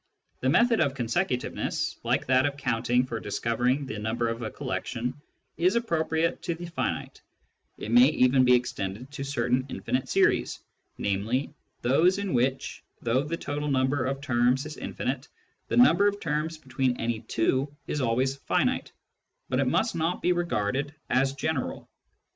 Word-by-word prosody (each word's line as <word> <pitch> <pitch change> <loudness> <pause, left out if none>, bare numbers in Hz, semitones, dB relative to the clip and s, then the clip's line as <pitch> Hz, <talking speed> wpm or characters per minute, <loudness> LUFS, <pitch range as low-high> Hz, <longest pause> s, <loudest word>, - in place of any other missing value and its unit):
The 130 - +1
method 230 - +4
of 140 -4 +2
consecutiveness, 125 +2 -1
like - - +1
that 130 +2 +4
of 140 -1 -4
counting 125 -2 +1
for 115 -3 -4
discovering 120 +6 0
the 110 -5 -5
number 115 +2 -1
of 115 +1 -4
a 110 - -3
collection, 120 +8 -3 0.4
is 180 +5 +3
appro 195 -9 0
priate 160 +1 0
to 170 - -2
the 175 +1 -7
finite; 170 - -3 0.6
it 110 - -6
may 120 +2 +8
even 130 -3 +4
be 125 0 +6
extended 120 0 -3
to 135 -1 -5
certain 130 -2 0
infinite 130 -1 -2
series, - - +2 0.4
namely, 110 +9 -1 0.3
those 165 +10 +4
in 200 -3 -2
which, 130 +2 0 0.2
though 120 +3 +2
the 155 +4 -3
total 145 0 -3
number 130 0 +1
of 135 +1 -2
terms 125 +1 +2
is 155 0 -7
infinite, 130 +3 -4 0.4
the - - -1
number 240 -5 +6
of 205 0 0
terms 155 0 -2
between 130 -3 -1
any 115 -1 -1
two 130 +5 0
is 150 - -2
always 130 +3 +1
finite; - - 0 0.6
but - - +1
it - - +2
must - - +1
not 165 +2 -1
be 180 - +2
regarded 145 -4 -1 0.2
as 135 +1 +2
general. 140 0 -3
130 Hz, 160 wpm, -27 LUFS, 120-150 Hz, 0.6 s, may